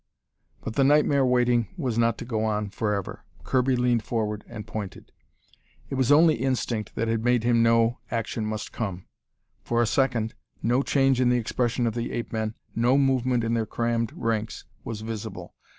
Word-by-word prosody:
But 110 Hz, -, -5 dB
the 135 Hz, -, +2 dB
nightmare 145 Hz, 0 st, +4 dB
waiting 125 Hz, -2 st, +2 dB
was 130 Hz, -9 st, -2 dB
not 115 Hz, -1 st, +2 dB
to -, -, -7 dB
go 110 Hz, -3 st, -1 dB
on 105 Hz, -2 st, -1 dB
forever. 105 Hz, -2 st, -3 dB, 0.2 s
Kirby 130 Hz, 0 st, +2 dB
leaned 120 Hz, -2 st, +2 dB
forward 105 Hz, -2 st, -2 dB
and 105 Hz, -, -8 dB
pointed. 105 Hz, -3 st, -7 dB, 0.8 s
It -, -, -2 dB
was 130 Hz, 0 st, +2 dB
only 160 Hz, +2 st, +6 dB
instinct 120 Hz, -4 st, -2 dB
that 115 Hz, -, -1 dB
had 115 Hz, 0 st, 0 dB
made 120 Hz, -1 st, +2 dB
him 120 Hz, -1 st, +3 dB
know 115 Hz, +1 st, +3 dB
action 115 Hz, -1 st, -2 dB
must 110 Hz, 0 st, -4 dB
come. 95 Hz, -5 st, -4 dB, 0.6 s
For 120 Hz, -, 0 dB
a 120 Hz, -, +4 dB
second, 120 Hz, -2 st, +1 dB, 0.3 s
no 120 Hz, +3 st, +2 dB
change 135 Hz, -2 st, +2 dB
in 125 Hz, -, +4 dB
the 125 Hz, -, +3 dB
expression 120 Hz, +1 st, 0 dB
of 115 Hz, -, 0 dB
the 120 Hz, +1 st, -3 dB
ape 120 Hz, 0 st, -4 dB
men, 110 Hz, 0 st, -2 dB, 0.2 s
no 120 Hz, +4 st, +3 dB
movement 130 Hz, -3 st, +2 dB
in 115 Hz, 0 st, 0 dB
their 115 Hz, -2 st, 0 dB
crammed 115 Hz, 0 st, -1 dB
ranks, 115 Hz, -1 st, -2 dB, 0.2 s
was 110 Hz, -2 st, -5 dB
visible. 110 Hz, -1 st, -6 dB
115 Hz, 180 wpm, -26 LUFS, 110-125 Hz, 0.8 s, only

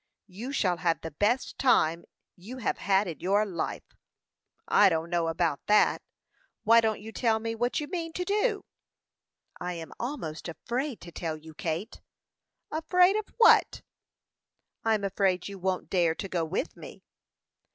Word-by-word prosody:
"You 215 Hz, +7 st, -7 dB
shall 185 Hz, -10 st, +1 dB
have 165 Hz, -1 st, 0 dB
the 160 Hz, -, -6 dB
best 210 Hz, -, 0 dB
time 170 Hz, -10 st, +3 dB, 0.3 s
you 215 Hz, +9 st, -10 dB
have 255 Hz, -, -2 dB
had 195 Hz, +1 st, +2 dB
in 165 Hz, -, -6 dB
your 200 Hz, +3 st, +2 dB
life." 185 Hz, -5 st, -4 dB, 0.8 s
"I -, -, +6 dB
don't 165 Hz, 0 st, -2 dB
know 170 Hz, -1 st, +1 dB
about 165 Hz, -3 st, -1 dB
that. 210 Hz, 0 st, +4 dB, 0.6 s
Why 230 Hz, +1 st, +6 dB
don't 220 Hz, -1 st, 0 dB
you 220 Hz, +2 st, -9 dB
tell 225 Hz, -1 st, +1 dB
me 225 Hz, +1 st, -3 dB
what 240 Hz, +2 st, -1 dB
you 300 Hz, -, -3 dB
mean 335 Hz, -2 st, -4 dB
to 360 Hz, -, -3 dB
do?" 415 Hz, +1 st, 0 dB, 0.9 s
"I 180 Hz, 0 st, -3 dB
am 165 Hz, -2 st, -8 dB
almost 205 Hz, -, -5 dB
afraid 245 Hz, -, -4 dB
to 170 Hz, -, -10 dB
tell 160 Hz, -1 st, -4 dB
you, 160 Hz, +1 st, -13 dB
Kate." 165 Hz, +4 st, -4 dB, 0.7 s
"Afraid 360 Hz, +4 st, +3 dB
of 430 Hz, -1 st, -2 dB
what?" 465 Hz, -, +5 dB, 1.0 s
"I'm 220 Hz, -2 st, +1 dB
afraid 190 Hz, -2 st, 0 dB
you 200 Hz, -1 st, -8 dB
won't 185 Hz, 0 st, -2 dB
dare 170 Hz, -3 st, +2 dB
to 195 Hz, -, -5 dB
go 175 Hz, -3 st, -1 dB
with 160 Hz, +4 st, -3 dB
me." -, -, -12 dB
200 Hz, 160 wpm, -28 LUFS, 170-245 Hz, 1.0 s, I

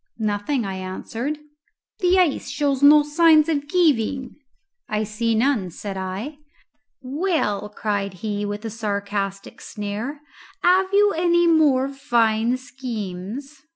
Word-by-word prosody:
"Nothing," 215 Hz, +4 st, -1 dB
I 190 Hz, -1 st, -4 dB
answered. 225 Hz, +9 st, -4 dB, 0.6 s
"The 365 Hz, -1 st, +3 dB
ice 355 Hz, -6 st, +1 dB
shows 285 Hz, -2 st, 0 dB
no 295 Hz, +1 st, +8 dB
signs 310 Hz, +1 st, +5 dB
of 290 Hz, -3 st, -1 dB
giving?" 275 Hz, -7 st, +1 dB, 0.5 s
"I 215 Hz, 0 st, 0 dB
see 225 Hz, +2 st, -1 dB
none," 225 Hz, -5 st, +1 dB
said 195 Hz, +3 st, -7 dB
I. 190 Hz, +11 st, -5 dB, 0.6 s
"Well," 265 Hz, -, -1 dB
cried 205 Hz, -2 st, -3 dB
he, 205 Hz, -1 st, -2 dB
with 205 Hz, +2 st, -4 dB
a 225 Hz, -, -4 dB
sarcastic 200 Hz, -2 st, -4 dB
sneer, 215 Hz, +8 st, -5 dB, 0.4 s
"have 370 Hz, +2 st, +4 dB
you 410 Hz, 0 st, +4 dB
any 345 Hz, +1 st, +3 dB
more 300 Hz, -6 st, +4 dB
fine 235 Hz, -3 st, +1 dB
schemes?" 250 Hz, +1 st, -6 dB
245 Hz, 120 wpm, -22 LUFS, 205-295 Hz, 0.6 s, no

